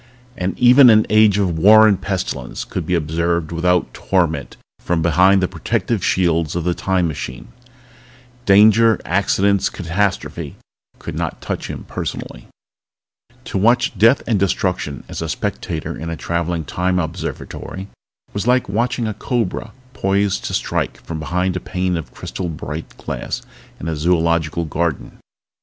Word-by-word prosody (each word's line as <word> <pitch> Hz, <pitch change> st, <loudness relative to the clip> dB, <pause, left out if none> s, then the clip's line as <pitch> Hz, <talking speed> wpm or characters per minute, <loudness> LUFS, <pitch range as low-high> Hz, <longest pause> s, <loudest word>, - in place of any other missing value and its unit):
But 90 Hz, +1 st, -3 dB
even 125 Hz, +1 st, +7 dB
an 110 Hz, -1 st, +6 dB
age 110 Hz, -2 st, +5 dB
of 90 Hz, -5 st, 0 dB
war 110 Hz, +5 st, +8 dB
and 100 Hz, -3 st, +2 dB
pestilence 95 Hz, -3 st, -3 dB
could -, -, -5 dB
be 90 Hz, -, +1 dB
observed 85 Hz, +1 st, -1 dB
without 90 Hz, +1 st, +1 dB
torment 85 Hz, -4 st, -1 dB, 0.2 s
from 85 Hz, -2 st, -1 dB
behind 95 Hz, +3 st, +4 dB
the -, -, +2 dB
protective -, -, -2 dB
shields 85 Hz, -4 st, +1 dB
of 85 Hz, -, -1 dB
the 90 Hz, +1 st, +1 dB
Time 95 Hz, -1 st, 0 dB
Machine. 65 Hz, -, -6 dB, 1.0 s
Danger, 110 Hz, +3 st, +6 dB
accidents, 100 Hz, +1 st, +2 dB
catastrophe 95 Hz, +2 st, -2 dB, 0.4 s
could -, -, -7 dB
not -, -, -3 dB
touch -, -, -4 dB
him -, -, -6 dB
personally. -, -, -6 dB, 1.0 s
To -, -, -2 dB
watch 120 Hz, +4 st, +3 dB
death 115 Hz, +7 st, +4 dB
and 110 Hz, -4 st, +1 dB
destruction 90 Hz, -7 st, -1 dB
as -, -, -6 dB
a -, -, -3 dB
spectator 80 Hz, -3 st, -3 dB
in 85 Hz, +1 st, -6 dB
a 85 Hz, -, -4 dB
traveling 85 Hz, +2 st, -2 dB
Time 90 Hz, +6 st, -1 dB
Observatory 90 Hz, +3 st, -5 dB, 0.5 s
was 100 Hz, +3 st, -3 dB
like 125 Hz, 0 st, +3 dB
watching 115 Hz, +4 st, -1 dB
a 110 Hz, -, -2 dB
cobra 115 Hz, -1 st, -2 dB, 0.2 s
poised 100 Hz, -2 st, 0 dB
to -, -, -2 dB
strike -, -, -2 dB
from 80 Hz, -1 st, -5 dB
behind 90 Hz, +3 st, -1 dB
a -, -, -1 dB
pane 90 Hz, 0 st, -2 dB
of 80 Hz, -, -5 dB
crystal 90 Hz, -2 st, -5 dB
bright 75 Hz, 0 st, -7 dB
glass -, -, -5 dB, 0.4 s
in 80 Hz, -, -6 dB
a 80 Hz, -, -1 dB
zoological 85 Hz, 0 st, +1 dB
garden. 80 Hz, -1 st, -3 dB
90 Hz, 150 wpm, -19 LUFS, 85-100 Hz, 1.0 s, war